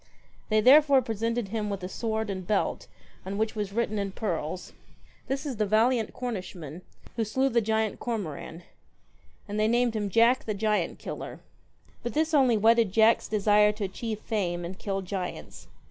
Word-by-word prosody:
They 215 0 +3
therefore 275 +2 +6
presented 230 0 -2
him 215 -1 -2
with 200 -2 -4
a - - -2
sword 220 +1 -2
and 185 -2 -6
belt 205 -2 0 0.4
on 195 +1 -5
which 220 +1 0
was 205 -2 -3
written 215 -1 -1
in 200 -1 -3
pearls 180 -3 -4 0.5
'This 270 +3 -2
is 265 -6 -4
the 215 - +1
valiant 225 +2 +2
Cornishman 185 - -6 0.4
Who 230 - +1
slew 260 +6 +1
the 235 -2 +2
giant 220 0 0
Cormoran 180 -7 -5 0.4
;' - - -34
and 205 +1 -3
they 215 - +3
named 240 0 +2
him 205 -2 -1
Jack 230 +5 +4
the 215 - -2
Giant 210 +1 0
killer. - - -7 0.6
But 240 - -5
this 315 +1 +1
only 260 -6 +4
whetted 225 -1 +4
Jack's 220 +3 +4
desire 210 0 +4
to 210 0 -5
achieve 215 +3 -4
fame, 175 -5 -2
and 180 +2 -6
kill 195 -1 -3
giants. 185 -1 -6
215 Hz, 175 wpm, -27 LUFS, 195-230 Hz, 0.6 s, therefore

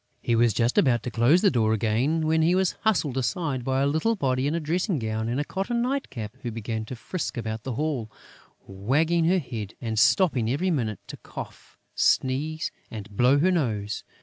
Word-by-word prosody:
He 115 - 0
was 115 0 +4
just 120 - +2
about 125 - +2
to 125 - -4
close 130 - +4
the 200 - +5
door 110 -3 +2
again, 120 +9 +1
when 160 +1 +2
he 170 +3 +3
was 190 -1 +2
hustled 165 - +1
aside 130 +1 -2
by 130 +1 0
a - - +3
little 160 +11 +1
body 130 -6 0
in 150 - 0
a - - 0
dressing 175 +3 -1
gown 110 -1 -2
and 125 +3 -1
a - - +1
cotton 195 +8 -2
night 270 +2 -2
cap, 110 -2 -7
who 120 - -3
began 110 0 -4
to 125 - -7
frisk 160 +4 -5
about 110 -1 -4
the 130 +3 -4
hall, 135 -4 -2 0.6
wagging 150 - +1
her 180 +3 +3
head 115 - -5
and 110 -3 -2
stopping 130 - +3
every 180 +9 0
minute 110 - -2
to - - -9
cough, - - -10 0.2
sneeze 150 +5 +1 0.2
and 105 -2 -9
blow 125 +6 +4
her 175 +6 +3
nose 110 - -1
130 Hz, 200 wpm, -26 LUFS, 115-165 Hz, 0.6 s, the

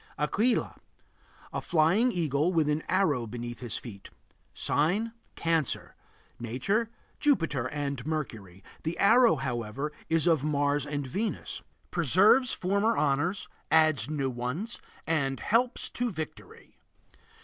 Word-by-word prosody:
AQUILA. 210 - 0 0.7
A - - -2
flying 175 +9 +3
eagle 160 - +1
with 160 -4 +2
an 150 +1 0
arrow 150 -11 +2
beneath 120 +1 -6
his 120 -4 -3
feet. 100 -5 -9 0.4
Sign: 190 +10 0 0.2
Cancer. 165 -4 -1 0.4
Nature: 130 - -1 0.3
Jupiter 165 - +1
and 140 -3 -3
Mercury; 115 - -5 0.2
the 160 +2 -3
arrow, 235 +4 +6
however, 125 +3 -3 0.2
is 165 -1 +3
of 160 -5 +3
Mars 145 -1 +1
and 145 -1 -3
Venus. 200 - -3 0.3
Preserves 190 - +4
former 200 +5 +1
honors, 150 +7 0 0.2
adds 155 -2 +4
new 140 -4 -1
ones, 125 - -4 0.2
and 140 -4 0
helps 245 +3 +1
to 245 0 -1
victory. 160 -6 -8
155 Hz, 115 wpm, -29 LUFS, 135-190 Hz, 0.7 s, arrow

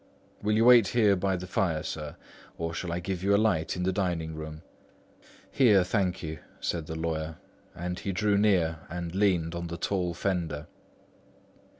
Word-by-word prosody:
"Will 105 +1 +1
you 115 +1 +4
wait 120 -4 +8
here 105 -3 +4
by 95 +1 0
the 90 - -6
fire, 85 -4 0
sir? 75 -2 -5 0.4
or 85 0 -3
shall 85 +1 -4
I 85 - -1
give 90 0 -3
you 100 +1 +4
a - - +5
light 100 -7 +1
in 90 - -2
the 95 +1 +1
dining 85 -4 -1
room?" 80 0 -7 0.9
"Here, 105 -8 +5
thank 95 -1 0
you," 80 -1 -5 0.2
said 80 -3 -2
the 80 - -5
lawyer, 80 -1 -2 0.4
and 90 +1 -4
he 100 - -3
drew 100 +3 +1
near 90 -6 +2
and 85 0 -5
leaned 90 -4 +2
on 85 0 -4
the 85 0 -5
tall 90 -1 -1
fender. 85 -6 -2
90 Hz, 180 wpm, -28 LUFS, 80-100 Hz, 0.9 s, wait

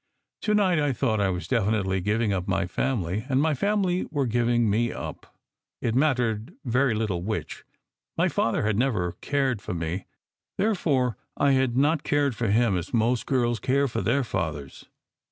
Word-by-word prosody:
To 210 -1 +1
night, 185 -6 +3
I 145 -2 +1
thought, 115 -3 0
I 100 - +2
was 90 -1 -3
definitely 105 -5 +1
giving 105 +2 +1
up 90 -1 -2
my 95 0 +1
family, 105 +1 -2
or 130 - 0
my 150 +3 +3
family 190 +3 0
were 145 -3 0
giving 120 0 +2
me 115 +3 +1
up, - - -8 0.4
it 115 - -1
mattered 125 - 0
very 125 0 +2
little 105 -5 -1
which. 110 +4 -4 0.5
My - - +3
father - - 0
had 105 0 +1
never 105 -9 +1
cared 135 -6 0
for 90 - -5
me, 85 +3 -3 0.5
therefore 145 - +1 0.2
I 140 - +3
had 130 -2 +2
not 150 +3 +3
cared 145 -4 +1
for 115 - -1
him 110 0 +3
as 90 +7 -4
most 115 +2 +1
girls 120 -3 +1
care 140 +5 +1
for 120 - -3
their 140 0 +1
fathers. 80 - -4
120 Hz, 170 wpm, -26 LUFS, 105-140 Hz, 0.5 s, night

